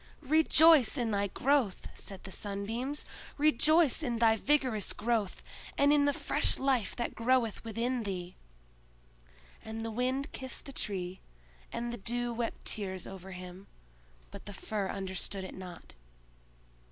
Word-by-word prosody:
"Rejoice 310 -2 +6
in 235 -3 0
thy 200 0 +1
growth!" 255 -1 +1
said 195 -2 -8
the 190 - -8
Sunbeams, 225 +9 -3 0.3
"rejoice 310 0 +4
in 245 -6 -1
thy 225 -1 +4
vigorous 255 -4 +1
growth, 220 -3 -1 0.3
and 285 +1 +5
in 290 -1 +4
the 285 - +4
fresh - - +2
life 265 -5 +1
that 240 - -3
groweth 235 -2 +1
within 235 +3 -1
thee!" 185 -4 -5 1.3
And 225 +1 -5
the 225 - -3
Wind 255 +4 -1
kissed 260 -2 -5
the 275 - -7
Tree, 190 -5 -2 0.5
and 235 0 -3
the - - -4
Dew 240 +3 -1
wept 230 0 -4
tears 190 -4 -3
over 190 -1 -9
him; 185 +1 -9 0.6
but - - -10
the 205 - -6
Fir 200 0 -3
understood 190 0 -3
it 185 - -7
not. 185 -2 -10
230 Hz, 140 wpm, -31 LUFS, 195-260 Hz, 1.3 s, Rejoice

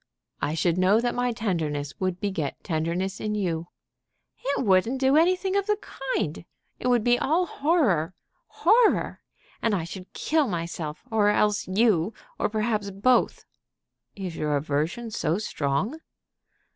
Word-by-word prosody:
"I 150 - -1
should 170 +2 +1
know 190 +4 +4
that 240 +1 0
my 245 0 0
tenderness 160 - -2
would 185 -1 -1
beget 190 -9 -3
tenderness 170 +4 -2
in 210 0 -2
you." 170 -5 -2 0.8
"It 275 -1 0
wouldn't 205 +7 +3
do 265 +1 +3
anything 370 +4 +3
of 400 0 +1
the 420 -1 +2 0.4
kind. 150 +1 -2 0.4
It - - -2
would 245 -3 +3
be 245 +1 +3
all 330 +6 +2
horror, 255 - +1 0.3
horror. 440 +5 +3 0.4
I 205 -7 +1
should 185 +2 -9
kill 310 -3 +1
myself, 165 -4 -4
or 210 -2 +3
else 210 0 +2
you, 205 -1 +2 0.2
or - - +1
perhaps 215 -1 -1
both." 210 +6 +2 0.7
"Is 185 -4 -5
your 150 -1 0
aversion 155 +11 -2
so 165 -4 0
strong?" 190 - -2
205 Hz, 140 wpm, -26 LUFS, 170-245 Hz, 0.8 s, know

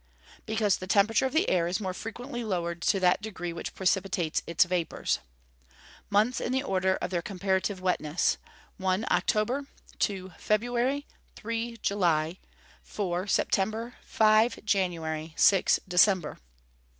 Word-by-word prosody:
_ - - -37
Because 215 -3 +1
the 185 - -8
temperature 210 +6 +3
of - - -6
the 320 +7 +2
air 170 -2 +2
is 180 +4 -1
more 190 -3 -3
frequently 240 +5 -6
lowered 170 -5 -2
to 195 - +2
that 180 +1 +3
degree 185 -5 -5
which 170 - -6
precipitates 190 -3 0
its 170 +2 +4
vapours. 180 -2 -1 0.9
Months 215 +5 +2
in - - -2
the 265 +1 0
order 190 -5 +1
of - - -4
their 175 -2 0
comparative 190 +1 -1
wetness: 175 -3 0 0.4
1. 190 +1 0
October. 250 +7 +1 0.3
2. 190 -2 -2
February. 245 +6 0 0.3
3. 230 +1 -4
July. 170 -4 +1 0.4
4. 185 -2 -3
September. 220 +5 0
5. 220 +2 +3
January. 165 -6 -1
6. 195 -2 +5
December. 180 -2 +3
195 Hz, 135 wpm, -28 LUFS, 180-220 Hz, 0.9 s, 6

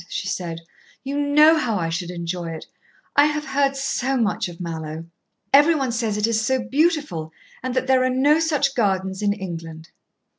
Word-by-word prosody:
she 190 - -4
said. 170 -3 -4 0.4
"You 275 +1 -4
know 295 +2 +5
how 235 -8 0
I 165 -3 -1
should 170 +1 -3
enjoy 170 -1 -4
it. 160 -1 -7 0.5
I 290 - +6
have 300 0 -1
heard 275 -1 +1
so 270 -1 -1
much 210 -5 0
of 170 - -12
Mallowe. 160 -2 -5 0.5
Every 295 +4 +6
one 270 -4 -1
says 225 -3 -1
it 210 - +2
is 225 -1 +1
so 260 +4 +1
beautiful 290 - 0 0.3
and 255 0 -4
that 255 0 0
there 260 -1 +3
are 255 - +2
no 280 +5 +3
such 300 -4 +1
gardens 190 -4 0
in 205 -1 +2
England." 165 -5 -7
230 Hz, 185 wpm, -22 LUFS, 175-280 Hz, 0.5 s, I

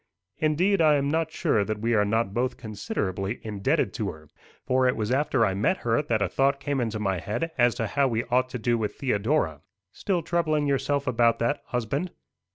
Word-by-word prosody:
"Indeed, 170 +6 +2
I 155 -2 +5
am 140 -1 +1
not 160 0 0
sure 105 - +1
that 110 +1 -3
we 115 +3 0
are 105 -2 +3
not 105 -1 0
both 125 +2 -1
considerably 100 -2 -3
indebted 105 -3 0
to - - -2
her; 75 -1 -11 0.4
for 130 0 +2
it 125 - +2
was 110 +1 -2
after 135 -3 +2
I 95 - 0
met 110 - +1
her 115 +3 +2
that 115 -8 0
a - - +1
thought 135 +6 +1
came 140 -1 -1
into 110 -2 -2
my 95 -3 -1
head 135 - -3
as 120 -1 +3
to 115 -2 -2
how 140 +5 +1
we 115 -2 -1
ought 125 +1 +1
to 125 - -4
do 120 0 0
with 105 -2 -2
Theodora." 110 - 0 0.3
"Still 180 - -2
troubling 155 -3 0
yourself 140 0 0
about 120 -2 +3
that, 120 +5 0
husband?" 125 +9 -2
120 Hz, 205 wpm, -26 LUFS, 110-145 Hz, 0.4 s, I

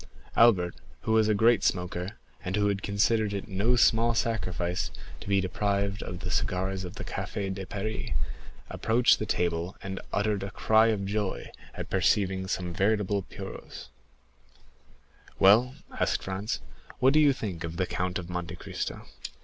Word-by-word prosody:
Albert, 95 -7 +5 0.3
who 110 - -2
was 110 -1 +4
a 110 - +3
great 115 0 +4
smoker, 90 +1 -1 0.3
and 95 +1 -2
who 105 0 +2
had 100 -1 -1
considered 105 +1 +1
it 100 - -4
no 105 +5 +2
small 115 -1 +4
sacrifice 90 -6 -1 0.3
to - - -11
be 100 -1 +4
deprived 100 +1 -1
of 90 0 -6
the 90 - -4
cigars 95 +1 -1
of 90 +1 -7
the - - -6
Café 100 0 -3
de 95 -1 -6
Paris, 110 +2 -4 0.6
approached 120 +2 +3
the 110 - -3
table, 85 0 -1
and 95 0 -5
uttered 100 -1 0
a 100 - -4
cry 110 +2 +4
of 105 -3 0
joy 100 -1 -2 0.2
at - - -6
perceiving 95 0 +2
some 90 -2 -2
veritable 100 +1 +1
puros. 90 - -9 1.5
"Well," 115 +7 +6 0.2
asked - - 0
Franz, 95 -7 -3 0.4
"what 130 +2 +4
think 130 - +2
you - - -2
of 85 - -8
the 90 - +1
Count 90 0 -2
of 90 -2 -6
Monte 90 -1 -4
Cristo?" - - -5
100 Hz, 155 wpm, -28 LUFS, 95-110 Hz, 1.5 s, Well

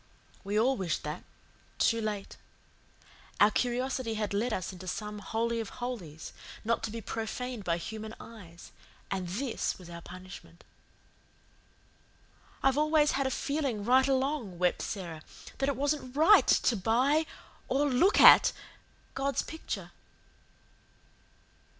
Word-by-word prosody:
We 205 +2 0
all 260 +4 +2
wished 180 -5 -2
that 150 +3 -5 0.5
too 230 -1 +2
late. 210 -2 -4 1.0
Our 205 +1 +6
curiosity 250 0 -1
had 210 -2 -2
led 225 +5 0
us 190 -2 -3
into 185 0 -10
some 210 +2 -4
Holy 230 +3 -1
of 225 - -4
Holies, 195 -12 -6 0.3
not 230 +1 +1
to - - -4
be 230 +1 -6
profaned 225 +2 -4
by 170 -2 0
human 220 +5 -7
eyes, 175 -7 -12 0.4
and 190 -2 -2
this 230 +7 -2
was 175 -2 -12
our 170 0 -8
punishment. 185 -1 -12 2.0
"I've 270 +1 +3
always 305 0 +3
had 270 0 0
a - - 0
feeling 265 -6 -2
right 260 +3 +5
along," 265 - -1
wept 180 0 +1
Sara, 170 -6 -5 0.4
"that 270 +1 +1
it 280 - 0
wasn't 280 -2 -2
RIGHT 325 +8 +6
to 240 - +3
buy 255 - +2 0.4
or 280 +2 +1
LOOK 285 +10 +3
AT - - +9 0.6
God's 275 +1 -1
picture." 320 - -6
230 Hz, 130 wpm, -30 LUFS, 195-265 Hz, 2.0 s, AT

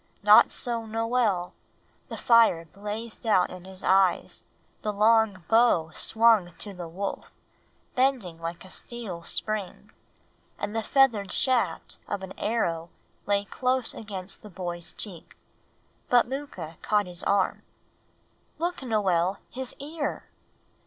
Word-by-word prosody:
Not - - +8
so 235 -3 -3
Noel. 225 -5 0 0.6
The - - -5
fire 230 -8 +5
blazed 210 +6 -7
out 185 -4 +3
in 185 0 -10
his 190 0 -8
eyes; 190 -1 +2 0.4
the 210 - -1
long 210 -2 +3
bow 225 -9 +4
swung 220 +1 +4
to 200 +4 -8
the 180 -2 -7
wolf, 195 +4 -5 0.6
bending 250 -11 0
like 170 +2 -5
a 185 - -10
steel 220 -8 -5
spring, 210 +1 -2 0.7
and 205 +1 -4
the 225 - +1
feathered 225 -6 +3
shaft 235 -10 0
of 200 -1 -3
an 190 - -7
arrow 170 -7 -1 0.4
lay 200 0 +2
close 255 +3 -1
against 195 -3 -6
the 210 - -11
boy's 175 -2 -5
cheek. 180 -6 -9 0.7
But 245 -1 +5
Mooka 235 - -6
caught 210 -1 +2
his 180 -1 -6
arm 200 -1 +1 1.0
"Look, 345 +1 -2
Noel, 195 -6 +1
his 260 0 -3
ear! 295 +1 -4
205 Hz, 125 wpm, -27 LUFS, 180-230 Hz, 1.0 s, Not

